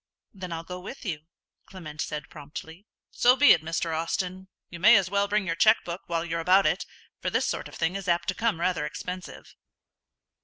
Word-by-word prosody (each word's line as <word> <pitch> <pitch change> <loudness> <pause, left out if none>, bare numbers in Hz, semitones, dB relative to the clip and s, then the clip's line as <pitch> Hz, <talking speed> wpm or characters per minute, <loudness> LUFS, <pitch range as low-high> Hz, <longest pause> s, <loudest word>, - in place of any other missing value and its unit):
"Then 185 -3 -7
I'll 165 0 -4
go 180 +2 -7
with 205 +9 -9
you," 165 -7 -2 0.5
Clement 155 -5 -8
said, 150 -3 -4
promptly. 160 +5 -10 0.2
"So 245 +1 +5
be 290 +2 +7
it, - - +5
Mr. 165 0 -2
Austin. 180 +3 -3 0.2
You 170 - -10
may 215 +6 +8
as 195 -2 +2
well 200 0 +2
bring 210 0 0
your 165 - 0
cheque 220 +5 +4
book 175 +2 -5
while 170 0 -1
you're 165 0 -2
about 185 +4 +4
it, - - 0 0.3
for - - -1
this - - +1
sort - - -3
of - - -13
thing 165 +3 -1
is 195 -1 -5
apt 170 -1 +1
to - - +1
come 220 -3 0
rather 170 -3 0
expensive." 180 0 -8
180 Hz, 205 wpm, -27 LUFS, 165-195 Hz, 0.5 s, may